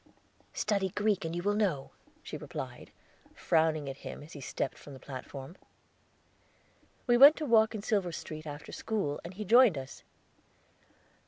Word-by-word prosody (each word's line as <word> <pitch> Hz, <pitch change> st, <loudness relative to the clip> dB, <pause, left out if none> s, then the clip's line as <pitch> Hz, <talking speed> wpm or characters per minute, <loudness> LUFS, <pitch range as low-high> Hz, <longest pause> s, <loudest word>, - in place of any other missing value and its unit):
"Study 200 Hz, -3 st, 0 dB
Greek 205 Hz, -1 st, 0 dB
and 165 Hz, +1 st, -3 dB
you 175 Hz, -, -3 dB
will 205 Hz, +1 st, +2 dB
know," 190 Hz, -10 st, 0 dB, 0.3 s
she -, -, -7 dB
replied, -, -, -7 dB, 0.5 s
frowning 160 Hz, -2 st, +1 dB
at 135 Hz, 0 st, -5 dB
him -, -, -8 dB
as 155 Hz, -, -13 dB
he 145 Hz, -, -9 dB
stepped 135 Hz, -, -3 dB
from 145 Hz, -, -11 dB
the 135 Hz, -, -11 dB
platform. 135 Hz, +3 st, -8 dB, 1.5 s
We 240 Hz, -1 st, +4 dB
went 285 Hz, +4 st, +10 dB
to 310 Hz, -, -4 dB
walk 225 Hz, -3 st, +4 dB
in 205 Hz, -, -5 dB
Silver 200 Hz, -6 st, 0 dB
Street 155 Hz, -1 st, -7 dB
after 145 Hz, +1 st, -8 dB
school, 200 Hz, -10 st, -2 dB
and 175 Hz, +2 st, -9 dB
he 210 Hz, +2 st, -5 dB
joined 230 Hz, -, +6 dB
us. 135 Hz, 0 st, -8 dB
175 Hz, 160 wpm, -31 LUFS, 145-215 Hz, 1.5 s, went